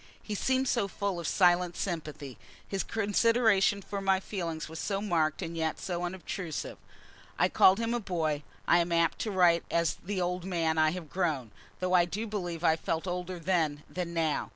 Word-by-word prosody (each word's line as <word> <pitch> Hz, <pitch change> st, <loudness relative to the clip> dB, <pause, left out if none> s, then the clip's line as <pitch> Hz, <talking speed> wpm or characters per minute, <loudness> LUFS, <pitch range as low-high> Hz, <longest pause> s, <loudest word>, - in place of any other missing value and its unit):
He 215 Hz, -, -5 dB
seemed 260 Hz, +5 st, +1 dB
so 235 Hz, -6 st, +1 dB
full 200 Hz, -2 st, -3 dB
of 170 Hz, -, -4 dB
silent 175 Hz, -1 st, +3 dB
sympathy: 150 Hz, -, -5 dB, 0.3 s
his 195 Hz, -1 st, -2 dB
consideration 215 Hz, -2 st, +2 dB
for 200 Hz, +1 st, -4 dB
my 195 Hz, -1 st, +3 dB
feelings 170 Hz, -5 st, -4 dB
was 160 Hz, 0 st, -8 dB
so 195 Hz, -2 st, -1 dB
marked 165 Hz, -7 st, 0 dB
and 165 Hz, -, -5 dB
yet 160 Hz, -1 st, -1 dB
so 175 Hz, -1 st, -3 dB
unobtrusive. 175 Hz, -2 st, -5 dB, 0.6 s
I -, -, +2 dB
have -, -, +2 dB
called 190 Hz, +1 st, +6 dB
him 230 Hz, +1 st, -1 dB
a 240 Hz, -, 0 dB
boy. 160 Hz, -7 st, -1 dB, 0.3 s
I 170 Hz, -, +5 dB
am 170 Hz, 0 st, 0 dB
apt 170 Hz, 0 st, +2 dB
to 220 Hz, -, -2 dB
write 175 Hz, -3 st, +4 dB
as 170 Hz, -3 st, +1 dB
the 195 Hz, +1 st, -2 dB
old 180 Hz, 0 st, -1 dB
man 165 Hz, -3 st, 0 dB
I 155 Hz, 0 st, +5 dB
have 165 Hz, -2 st, -6 dB
grown, 150 Hz, -, -1 dB, 0.3 s
though 185 Hz, 0 st, -1 dB
I 175 Hz, -1 st, +6 dB
do 210 Hz, +6 st, -4 dB
believe 175 Hz, -6 st, -4 dB
I 160 Hz, -1 st, +4 dB
felt 165 Hz, +1 st, -2 dB
older 180 Hz, 0 st, -3 dB
then 160 Hz, -4 st, 0 dB
than 180 Hz, -2 st, -4 dB
now. 165 Hz, -3 st, 0 dB
175 Hz, 195 wpm, -30 LUFS, 165-195 Hz, 0.6 s, called